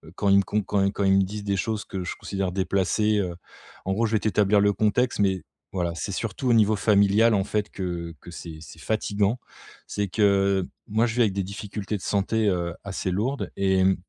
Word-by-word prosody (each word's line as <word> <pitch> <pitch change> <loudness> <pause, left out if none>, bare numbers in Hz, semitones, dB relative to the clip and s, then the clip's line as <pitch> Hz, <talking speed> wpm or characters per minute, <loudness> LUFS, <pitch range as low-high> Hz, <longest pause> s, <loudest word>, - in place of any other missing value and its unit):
quand 100 - 0
ils 100 - +6
me 100 - +4
com 105 +1 -1
quand 100 0 +1
quand 100 - -2
ils 95 0 +4
me - - +5
disent 105 +2 -5
des 100 -1 -1
choses 110 +1 -2
que 95 -1 -5
je 90 - -4
considère 95 -2 -3
déplacées, 100 +3 +1
heu. 90 -3 -2 0.5
En 95 - 0
gros 115 +4 +1
je 110 - -4
vais 110 - +3
t'établir 105 -1 +3
le 100 0 +3
contexte 110 +4 +1
mais, 95 -4 +1 0.3
voilà, 90 -3 -1
c'est 100 - -4
surtout 115 +5 -2
au - - +5
niveau 110 -1 +4
familial, 105 +2 +4
en 100 -2 +2
fait, 105 0 -1
que 85 -3 -4
que 90 - -12
c'est 85 -2 -8
c'est 80 0 -12
fatigant. 105 +5 0 0.5
C'est 100 -1 -2
que, 100 -1 +2 0.2
moi, 110 +3 +2
je 115 -1 -2
vis 125 - +2
avec 105 -5 +3
des 100 0 -1
difficultés 100 +2 -5
de 100 - -5
santé, 105 +3 0
heu, 85 -2 -1
assez 95 -1 -3
lourdes 120 +9 -2
et 95 -1 +2
mmh, 95 0 +4
100 Hz, 220 wpm, -25 LUFS, 95-105 Hz, 0.5 s, ils